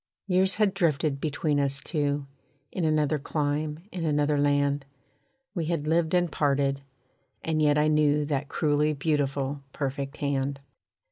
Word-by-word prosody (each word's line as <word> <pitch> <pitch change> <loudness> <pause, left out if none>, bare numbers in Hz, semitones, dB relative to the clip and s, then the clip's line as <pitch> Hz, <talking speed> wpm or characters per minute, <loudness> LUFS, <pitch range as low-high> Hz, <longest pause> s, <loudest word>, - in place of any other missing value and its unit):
Years 190 0 +2
had 210 -3 +2
drifted 155 -6 0
between 150 -1 0
us 140 -1 +1
two, 145 -1 -1 0.5
In 180 - -2
another 155 -1 +2
clime, 150 +2 -2
in 180 -2 -4
another 150 -1 +1
land, 145 0 +2 0.7
We 170 -5 -2
had 160 -2 -1
lived 160 +2 +2
and 175 -2 +2
parted, 140 -2 +1 0.6
and 160 -1 0
yet 150 -1 +4
I 150 +1 +3
knew 150 -1 +3
That 145 -1 -2
cruelly 150 0 +1
beautiful 140 -2 -1
perfect 140 0 -3
hand. 140 -1 -1
150 Hz, 140 wpm, -27 LUFS, 140-155 Hz, 0.7 s, yet